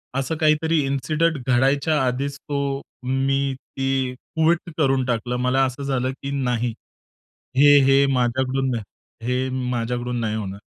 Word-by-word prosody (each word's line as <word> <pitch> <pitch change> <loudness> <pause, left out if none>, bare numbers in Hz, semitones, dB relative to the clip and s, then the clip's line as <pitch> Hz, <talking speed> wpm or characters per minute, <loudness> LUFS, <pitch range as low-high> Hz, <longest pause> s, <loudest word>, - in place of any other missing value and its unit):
असं 135 +4 -1
काहीतरी 155 +1 +2
इन्सिडंट 150 +5 0
घडायच्या 135 +4 +2
आधीच 140 +3 -2
तो 140 -1 -3 0.2
मी 135 +1 0
ती 135 -1 -2
क्विट 160 +6 0
करून 135 -4 +2
टाकलं. 120 0 -1
मला 125 +2 +2
असं 130 +2 -4
झालं 130 -2 -1
की 140 - -3
नाही. 120 -1 0 0.8
हे, 145 +1 +7
हे 135 +1 +5
माझ्याकडुन 130 +2 0
नाही, 115 -3 -2 0.4
हे 130 +1 0 0.2
माझ्याकडून 120 0 -2
नाही 110 -2 -1
होणार 100 -2 -5
135 Hz, 135 wpm, -22 LUFS, 125-140 Hz, 0.8 s, हे